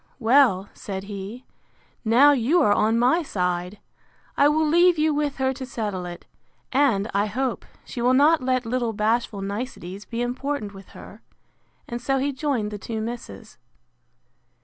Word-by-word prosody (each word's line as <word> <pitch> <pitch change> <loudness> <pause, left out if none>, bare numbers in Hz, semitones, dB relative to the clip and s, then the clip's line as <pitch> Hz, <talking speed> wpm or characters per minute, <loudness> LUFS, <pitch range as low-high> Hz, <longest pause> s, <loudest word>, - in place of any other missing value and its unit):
—Well, 235 -6 +4
said 190 -1 -6
he, 205 +5 -8 0.6
now 250 +6 +6
you 280 +6 +2
are 205 - +4
on 220 +2 +2
my 255 +9 +3
side, 180 - -2 0.6
I 285 - +5
will 310 +1 +2
leave 345 +2 +4
you 310 0 +2
with 290 -1 -1
her 265 0 0
to 265 0 -7
settle 205 -8 -4
it: 175 0 -9 0.5
and, 250 -7 +2
I 200 +1 +1
hope, 255 +4 -2 0.2
she 240 - -6
will 250 +2 +3
not 305 +3 +5
let 255 -1 0
little 235 -1 -1
bashful 215 -1 0
niceties 200 -2 -6
be 235 0 -3
important 250 -3 -3
with 195 -1 -12
her; - - -12 0.7
and 240 0 -5
so 270 +2 0
he 275 +2 0
joined 260 -7 -1
the 210 - -6
two 220 +3 -5
misses. 230 -1 -7
240 Hz, 160 wpm, -24 LUFS, 205-275 Hz, 0.7 s, now